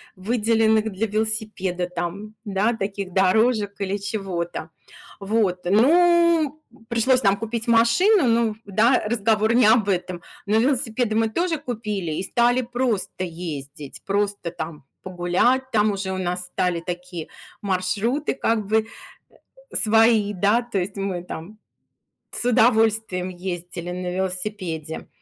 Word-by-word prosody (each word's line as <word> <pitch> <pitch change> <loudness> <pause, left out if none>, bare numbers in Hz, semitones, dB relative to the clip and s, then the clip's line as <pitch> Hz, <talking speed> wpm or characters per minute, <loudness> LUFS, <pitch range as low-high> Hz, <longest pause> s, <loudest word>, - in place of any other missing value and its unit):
выделенных 220 +1 +1
для 200 +4 -1
велосипеда, 215 -4 -1
там, 180 +5 -5
да, 210 +2 0
таких 195 -3 -4
дорожек 205 +2 +2
или 200 0 -1
чего-то. 185 -5 -4 0.5
Вот. 200 -3 0
Ну, 320 - +4
м, 230 -2 -21
пришлось 250 +2 +2
нам 200 -1 +3
купить 225 +1 -4
машину. 245 - +4
Ну 230 -2 +2
да, 220 +6 +3
разговор 220 0 +1
не 240 -3 +5
об 220 -2 +4
этом, 180 -2 -2 0.3
но 210 +2 +3
велосипеды 235 -2 +1
мы 225 0 +2
тоже 335 +7 -1
купили 215 - -4
и 185 - -3
стали 240 +5 +2
просто 240 -6 -2
ездить, 155 -5 -7
просто, 200 -3 -1
там, 160 -3 -7 0.2
погулять. 185 +9 +1
Там 210 -1 +3
уже 195 -1 -3
у 190 - -3
нас 180 -1 -2
стали 180 -1 -1
такие 175 -1 -6 0.3
маршруты 200 +9 -1
как 225 -5 0
бы, 220 +3 +3
э, - - -13 0.9
э, - - -3
свои, 220 -1 +4
да. 205 +5 +2
То 235 -4 -3
есть 195 +3 -3
мы 195 -3 -3
там 180 +4 -9 0.7
с - - -4
удовольствием 220 -6 +2
ездили 175 -1 -6
на 180 0 -4
велосипеде. 185 -4 -4
210 Hz, 135 wpm, -23 LUFS, 185-230 Hz, 0.9 s, не